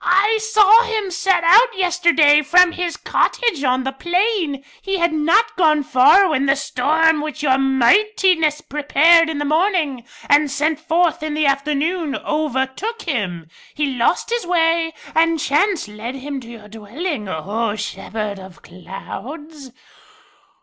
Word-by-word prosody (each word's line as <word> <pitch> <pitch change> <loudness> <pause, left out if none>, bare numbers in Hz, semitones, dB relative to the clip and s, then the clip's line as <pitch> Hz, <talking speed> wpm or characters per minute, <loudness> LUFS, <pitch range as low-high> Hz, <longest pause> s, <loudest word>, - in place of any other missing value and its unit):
"I 410 +5 +2
saw 435 0 +5
him 440 -5 -3
set 380 -1 0
out 445 +7 +4
yesterday 340 -5 +3
from 355 +4 +4
his 350 -1 -4
cottage 460 - -1
on 255 -1 0
the 265 - -3
plain. 345 -2 -2 0.2
He 390 0 -3
had 340 -2 0
not 410 +9 +1
gone 310 -4 +2
far 270 +10 +4
when 280 -4 -1
the 275 - +3
storm 305 +4 0
which 305 0 -6
Your 265 -2 +2
Mightiness 320 - +2
prepared 315 +4 +3
in 315 - -4
the 290 - -3
morning 310 - -1 0.2
and 290 +1 +3
sent 300 +2 -1
forth 330 +1 0
in 305 -1 -4
the 305 0 0
afternoon 290 +3 -1
overtook 305 - -3
him. 190 - -4 0.3
He 290 -3 -2
lost 245 - -1
his 475 -2 -1
way, 330 -1 +1 0.2
and 330 0 +1
chance 310 - 0
led 215 +5 -8
him 275 +1 -6
to 240 - -14
your 225 -3 -12
dwelling, 225 - -6
O 205 +6 -3
Shepherd 210 -1 -6
of 190 -1 -14
Clouds." 275 - -10
305 Hz, 145 wpm, -18 LUFS, 265-355 Hz, 0.3 s, saw